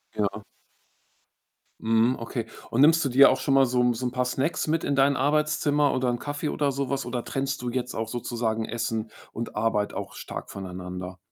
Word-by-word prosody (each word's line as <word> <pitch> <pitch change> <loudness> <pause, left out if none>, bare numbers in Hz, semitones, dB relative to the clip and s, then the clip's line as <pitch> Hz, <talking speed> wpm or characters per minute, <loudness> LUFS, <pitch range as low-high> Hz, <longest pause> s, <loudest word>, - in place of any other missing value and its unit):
Ja. 105 0 -1 1.4
Mhm, 115 +3 +3
okay. 115 0 -4 0.2
Und 120 - +2
nimmst 160 +2 +6
du - - +1
dir 135 +3 +8
auch 130 - +1
schon 135 +1 0
mal 135 0 +6
so 125 0 0
'n 125 0 +3
so 125 +2 -2
'n - - -3
paar 125 0 0
Snacks 135 +5 -1
mit 160 +1 +1
in 140 - 0
dein 140 +1 +4
Arbeitszimmer 145 +1 +2
oder 130 -1 +1
'n 120 - 0
Kaffee 145 +3 -3
oder 145 -1 0
so 135 0 -2
was? 135 -2 -1
Oder 120 -1 -3
trennst 135 0 -2
du 125 - -2
jetzt 125 0 -3
auch 110 0 -3
sozusagen 115 -1 -2
Essen 115 -1 -3 0.2
und 115 +1 -6
Arbeit 105 -1 0
auch - - -5
stark - - -7
voneinander? 90 -1 -7
125 Hz, 200 wpm, -26 LUFS, 115-140 Hz, 1.4 s, dir